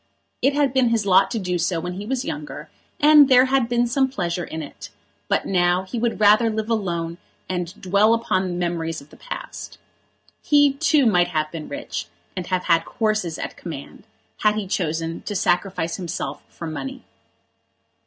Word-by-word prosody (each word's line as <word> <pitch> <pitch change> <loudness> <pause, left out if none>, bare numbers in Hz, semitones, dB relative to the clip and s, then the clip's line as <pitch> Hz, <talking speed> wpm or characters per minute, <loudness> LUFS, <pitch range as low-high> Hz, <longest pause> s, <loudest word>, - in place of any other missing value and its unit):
It 275 +3 +2
had 285 -3 +2
been 260 -3 +3
his 225 -3 +1
lot 190 0 +5
to - - -2
do 180 -4 -1
so 170 0 0
when 180 +2 -4
he 200 +3 -7
was 260 +1 -1
younger, 150 0 -6 0.3
and 295 -1 +7
there 255 0 +7
had 260 -3 +1
been 240 0 +2
some 265 +3 +1
pleasure 175 -8 -2
in 160 -1 -5
it; 145 - -10 0.4
but - - +1
now 180 0 +2
he 225 +5 -5
would 235 -1 -1
rather 215 +2 +5
live 220 +1 -3
alone 170 -5 -2 0.3
and 180 -1 -4
dwell 200 +4 +3
upon 190 -5 0
the 180 - -3
memories 170 -2 -2
of 140 +2 -17
the - - -14
past. - - -8 0.6
He, 290 -2 +4
too, 300 -1 +3
might 180 -6 +4
have 155 -3 -1
been 160 -2 -7
rich, 285 0 -5 0.3
and 185 -2 -4
have 185 -1 0
had 165 -1 +3
horses 215 -3 -1
at - - -5
command, 160 +5 -9 0.3
had 210 0 +2
he 215 -2 -2
chosen 165 -3 -2
to 205 - -5
sacrifice 180 -2 0
himself 180 -2 -4
for 170 - -8
money. 255 - -6
190 Hz, 185 wpm, -22 LUFS, 170-240 Hz, 0.6 s, and